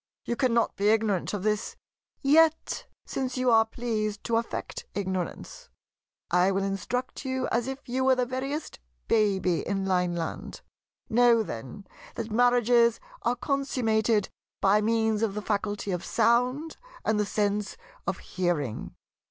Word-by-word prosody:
You 235 - -1
cannot 235 -3 +1
be 205 +1 +2
ignorant 215 -4 +1
of 205 -3 -3
this. 210 0 -1 0.5
Yet 315 +3 +3 0.2
since 260 -1 -3
you 255 -1 +2
are 225 -1 +5
pleased 215 -3 -3
to 230 -1 +1
affect 230 - -4
ignorance, 195 - -4 0.6
I 180 +2 +4
will 195 0 0
instruct 195 +8 -3
you 260 -1 -1
as 235 +1 0
if 270 +1 -6
you 255 +2 -1
were 265 0 +5
the 250 -1 +1
veriest 270 +5 -4 0.3
baby 195 -5 +2
in 195 -1 -2
Lineland. 180 - -2 0.5
Know, 235 -1 +4
then, 135 - -7 0.3
that 230 -1 -5
marriages 240 0 +4 0.2
are 240 - +1
consummated 235 -5 +1 0.3
by 200 +2 +4
means 220 0 +1
of 215 -3 0
the - - -1
faculty 205 -1 -2
of 180 0 -2
sound 250 +7 +1 0.3
and 215 -1 +2
the - - +3
sense 205 -1 -1 0.3
of 190 - 0
hearing. 170 -10 -2
220 Hz, 140 wpm, -27 LUFS, 200-245 Hz, 0.6 s, are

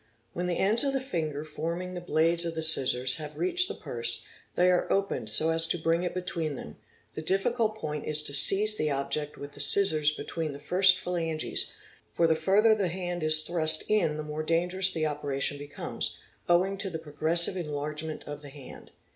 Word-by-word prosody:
When 180 +1 -3
the 175 - -2
ends 215 +6 +3
of 275 -1 0
the 270 - 0
finger 155 - -4
forming 170 +4 -5
the 180 - -6
blades 165 0 +1
of 165 -1 -4
the 160 - -3
scissors 130 -4 +3
have 150 -1 -8
reached 360 0 +2
the - - -6
purse, 460 0 -3 0.3
they 180 +1 +3
are 180 - 0
opened 195 - -1
so 155 +9 +6
as 165 0 +7
to 175 - -1
bring 165 +1 0
it 180 0 -4
between 165 -4 -4
them; 75 - -10 0.4
the - - -6
diffi 195 +8 -1
cult 220 -3 -1
point 150 -7 -5
1s 150 0 -1
to 140 - +1
seize 210 +8 +5
the 155 - -1
object 145 +1 -3
with 145 0 -9
the - - -15
'scissors 155 -1 +4
between 155 0 -5
the - - -8
first 185 +5 +4
phalanges, 165 -4 -3 0.4
for 170 - +1
the 165 - +3
further 195 +8 +3
the 205 -3 0
hand 175 0 -4
is 155 0 +2
thurst 160 -2 +3
in 175 -8 +1
the 155 - -5
more 150 +1 -5
dangerous 180 +4 +1
the 160 -3 -2
operation 145 -1 -3
becomes, 145 0 -5 0.3
owing 190 +3 +2
to 195 - -2
the 165 - -5
progressive 160 +3 +1
enlargement 150 -1 -5
of 145 0 -7
the 145 - -11
hand. 135 -2 -12
165 Hz, 200 wpm, -27 LUFS, 150-185 Hz, 0.4 s, as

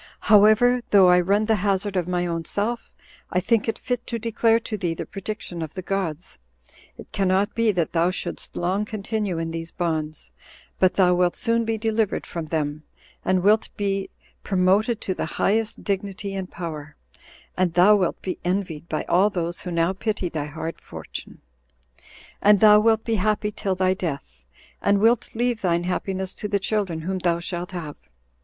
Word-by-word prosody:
However, 215 +4 +5
though 195 -3 +6
I 180 0 +6
run 200 +4 +2
the 220 0 +2
hazard 200 0 0
of 180 -2 0
my 180 -1 0
own 165 -1 -2
self, 220 +7 -2 0.4
I 180 - +1
think 220 +4 +1
it 225 - -1
fit 245 -1 -3
to 235 - -2
declare 230 0 +2
to 225 - -4
thee 175 -5 -2
the - - -5
prediction 195 -3 -6
of 160 -2 -6
the 185 - -5
gods. 180 - -3 0.6
It - - -12
cannot 195 +1 +1
be 230 -1 +2
that 170 -3 0
thou 170 +1 +2
shouldst 185 - -4
long 185 +4 0
continue 210 -3 -3
in 165 0 -3
these 165 0 -6
bonds; 155 - -3 0.5
but 185 -1 +3
thou 180 -2 +4
wilt 180 0 +2
soon 230 -1 +1
be 225 0 -1
delivered 220 -1 0
from 165 -2 -5
them, 150 -1 -2 0.4
and 185 -1 +1
wilt 215 +2 +3
be 195 -1 -1 0.3
promoted 200 +4 +2
to 190 - -2
the - - -3
highest 220 +2 0
dignity 200 0 -3
and 190 -1 -4
power, 155 -4 -7 0.6
and 180 -2 0
thou 190 +4 +7
wilt 185 -4 0
be 185 - -4
envied 175 -4 -2
by 155 - -2
all 190 +4 +3
those 175 -3 -3
who 180 - -6
now 170 +1 +1
pity 195 -2 -2
thy 155 -3 -3
hard 160 +2 -6
fortune; - - -9 1.0
and 205 0 +6
thou 210 0 +7
wilt 220 0 +3
be 225 -1 0
happy 210 +1 0
till 200 -2 -2
thy 185 0 +2
death, 140 - -6 0.4
and 200 0 +3
wilt 230 +3 +2
leave 240 -1 0
thine 170 -2 +1
happiness 190 +1 -1
to 210 - -5
the 205 -1 +1
children 195 -5 -1
whom 185 +3 -3
thou 170 -1 +1
shalt 175 +1 -4
have. 165 -5 -6
190 Hz, 180 wpm, -24 LUFS, 175-210 Hz, 1.0 s, thou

